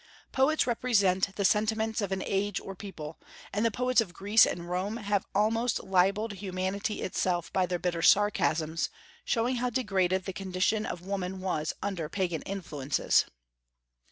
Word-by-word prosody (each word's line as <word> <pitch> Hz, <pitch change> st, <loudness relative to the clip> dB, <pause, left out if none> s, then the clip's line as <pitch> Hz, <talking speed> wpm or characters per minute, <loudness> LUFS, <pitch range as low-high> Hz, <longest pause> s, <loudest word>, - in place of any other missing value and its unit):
Poets 280 Hz, +4 st, +3 dB
represent 200 Hz, -6 st, +2 dB
the 200 Hz, -, 0 dB
sentiments 220 Hz, +2 st, +1 dB
of 200 Hz, -2 st, -2 dB
an 190 Hz, 0 st, -1 dB
age 200 Hz, 0 st, 0 dB
or 195 Hz, -, -7 dB
people; 165 Hz, -6 st, -8 dB, 0.3 s
and 210 Hz, -, 0 dB
the 230 Hz, -, +4 dB
poets 250 Hz, +3 st, +2 dB
of 175 Hz, -6 st, -6 dB
Greece 205 Hz, +3 st, +5 dB
and 175 Hz, 0 st, -4 dB
Rome 185 Hz, +5 st, -2 dB
have 205 Hz, -3 st, -1 dB
almost 225 Hz, +4 st, +1 dB
libelled 195 Hz, +4 st, +2 dB
humanity 195 Hz, +2 st, -3 dB
itself 175 Hz, -2 st, -1 dB
by 185 Hz, -1 st, +2 dB
their 180 Hz, 0 st, -1 dB
bitter 175 Hz, -1 st, -2 dB
sarcasms, 165 Hz, -5 st, +3 dB, 0.4 s
showing 245 Hz, +1 st, +1 dB
how 250 Hz, +1 st, 0 dB
degraded 190 Hz, -6 st, 0 dB
the 190 Hz, -, -4 dB
condition 190 Hz, +4 st, 0 dB
of 175 Hz, +1 st, -6 dB
woman 190 Hz, -1 st, -3 dB
was 175 Hz, -5 st, -1 dB
under 180 Hz, -6 st, -3 dB
Pagan 175 Hz, -4 st, -1 dB
influences. 150 Hz, -8 st, 0 dB
195 Hz, 155 wpm, -29 LUFS, 180-215 Hz, 0.4 s, Greece